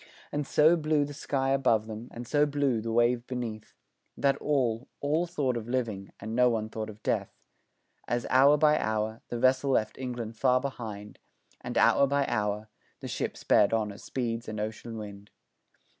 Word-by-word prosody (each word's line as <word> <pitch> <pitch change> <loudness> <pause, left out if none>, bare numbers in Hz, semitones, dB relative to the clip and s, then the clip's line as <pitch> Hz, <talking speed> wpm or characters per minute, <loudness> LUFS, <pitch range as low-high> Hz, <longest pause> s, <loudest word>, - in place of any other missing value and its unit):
And 145 -1 -2
so 155 +3 +5
blue 155 -2 +1
the 145 - -8
sky 135 -1 -1
above 115 -5 +2
them 110 +2 -7
and 120 +1 -7
so 150 +2 +3
blue 140 -5 0
the 115 +1 -3
wave 120 +1 +2
beneath, 120 -4 -5 0.4
That 140 -1 +2
all, 130 -5 0
all 155 +5 0
thought 140 -7 -1
of 115 0 -5
living 110 -6 -2
and 110 +2 -5
no 125 0 +5
one 110 -2 -1
thought 110 0 -5
of 110 0 -12
death, - - 0 0.8
As, 120 -1 -1
hour 140 +3 +6
by 150 0 +4
hour, 110 +1 -2
the 120 - -3
vessel 130 +3 +3
left 110 -5 0
England 120 -3 -5
far 125 +1 +3
behind, 110 -6 -6 0.4
And, - - -4
hour 140 - +5
by 140 0 +1
hour, 105 -2 -1 0.3
the - - -7
ship - - -3
sped 105 - +3
on 110 -2 0
as 100 - -12
speeds 115 -2 -3
an 110 0 -5
ocean 110 +2 -5
wind. 100 -1 -9
120 Hz, 180 wpm, -29 LUFS, 110-135 Hz, 0.8 s, hour